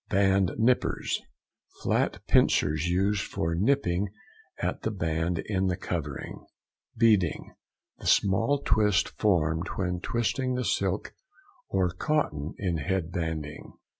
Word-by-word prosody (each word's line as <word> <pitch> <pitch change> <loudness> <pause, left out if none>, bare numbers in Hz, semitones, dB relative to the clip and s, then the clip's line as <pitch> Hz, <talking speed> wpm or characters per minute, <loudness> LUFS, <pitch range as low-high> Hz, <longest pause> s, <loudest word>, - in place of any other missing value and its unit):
BAND 95 -1 +3
NIPPERS.—Flat 120 +3 -1
pincers 75 +2 +3
used 95 +3 +1
for 80 +1 -2
nipping 100 -2 +1 0.5
up - - -2
the - - -1
band 85 -3 -1
in 95 -2 0
covering. 75 -6 -5 0.5
BEADING.—The 105 -8 -1
small 115 +9 +3
twist 105 -3 +3
formed 85 -5 +1
when 90 -2 -1
twisting 125 +5 -1
the 125 -1 -1
silk - - -1 0.6
or 95 -2 +1
cotton 90 - -1
in 90 -5 -1
head 85 +3 -2
banding. 80 -3 -4
95 Hz, 105 wpm, -28 LUFS, 80-105 Hz, 0.6 s, BAND